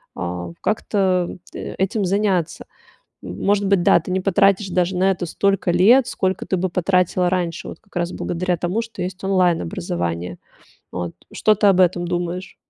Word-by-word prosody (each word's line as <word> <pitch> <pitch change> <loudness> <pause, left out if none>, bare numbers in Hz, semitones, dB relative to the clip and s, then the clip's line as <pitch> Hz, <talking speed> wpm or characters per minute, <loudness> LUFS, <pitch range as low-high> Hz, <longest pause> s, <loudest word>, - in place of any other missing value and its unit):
а, 90 0 -4
как-то 190 -4 0 0.2
этим 195 +2 -2
заняться. 190 -3 0 0.6
Может 200 - 0
быть, 195 -2 +3
да, - - +6
ты 165 - -8
не 190 - +1
потратишь 195 +1 +2
даже 180 +1 0
на 190 +2 +3
это 180 -1 -4
столько 195 +2 0
лет, 230 +9 +5
сколько 190 0 -2
ты 190 - 0
бы 185 +1 -1
потратила 180 0 +1
раньше. 175 -2 -2
Вот - - -9
как 205 -3 -25
раз 175 0 -1
благодаря 180 +1 -2
тому, 175 +6 -1
что 230 0 -7
есть 185 +2 -6
онлайн-образование. 90 - -1 0.5
Вот. 90 -2 -4 0.2
Что 215 - +3
ты 210 0 +3
об 190 -2 +4
этом 175 -1 +2
думаешь? 175 +1 -3
185 Hz, 160 wpm, -21 LUFS, 175-195 Hz, 0.6 s, да